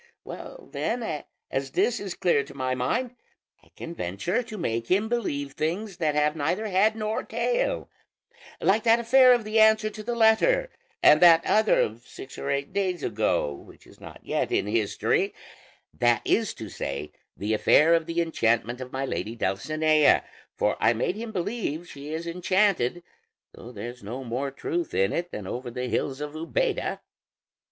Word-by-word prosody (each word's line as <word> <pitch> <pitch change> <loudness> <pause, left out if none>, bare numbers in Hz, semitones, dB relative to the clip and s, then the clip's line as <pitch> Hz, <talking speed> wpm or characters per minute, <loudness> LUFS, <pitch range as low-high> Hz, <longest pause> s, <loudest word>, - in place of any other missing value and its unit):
Well, - - -9
then, 240 +1 -2 0.5
as 135 0 -3
this 240 -1 +1
is 195 -3 -5
clear 170 -6 +2
to 140 0 -13
my 130 -1 -1
mind, 235 - -1 0.5
I - - -24
can 165 - -7
venture 135 - -2
to 230 -3 -8
make 115 - -2
him 200 +4 +2
believe 145 -13 -2
things 175 +7 -3
that 155 -4 0
have 150 +1 +2
neither 175 +8 -1
head 205 +3 +3
nor 215 0 -2
tail, - - -1 0.7
like 210 +3 +3
that 230 +1 +4
affair 255 +2 +6
of 240 -2 +4
the 215 +1 +1
answer 220 0 +5
to 215 - -8
the 240 +2 -3
letter, - - +3 0.3
and 150 - +7
that 170 -2 +7
other 215 +1 +3
of 115 +3 -2
six 130 - -10
or 140 - -4
eight 140 +3 -2
days 185 -5 -1
ago 105 -9 0
which - - -15
is - - -18
not - - -11
yet - - -1
in - - +1
history, 105 0 0 0.6
that - - +2
is - - +1
to - - -7
say, 70 +2 -5 0.3
the 105 +2 -1
affair 150 +9 +5
of 165 -1 +2
the 170 +1 0
enchantment 120 -5 0
of 130 0 -7
my 135 +1 -2
lady 115 -3 -4
Dulcinea; 155 +9 +2 0.3
for - - 0
I 115 - +4
made 120 - -1
him 225 +1 -6
believe 180 -4 -3
she 145 0 -9
is 160 +2 -4
enchanted, 175 -3 +1 0.5
though 120 - -11
there's 120 0 -8
no 120 +6 -6
more 130 +3 -3
truth 165 +5 -3
in 95 +1 +2
it 175 +1 -2
than 105 - -7
over 125 +6 -5
the 125 +1 -4
hills 135 +3 -2
of 150 0 -4
Úbeda." 165 - -2
165 Hz, 175 wpm, -26 LUFS, 130-215 Hz, 0.7 s, and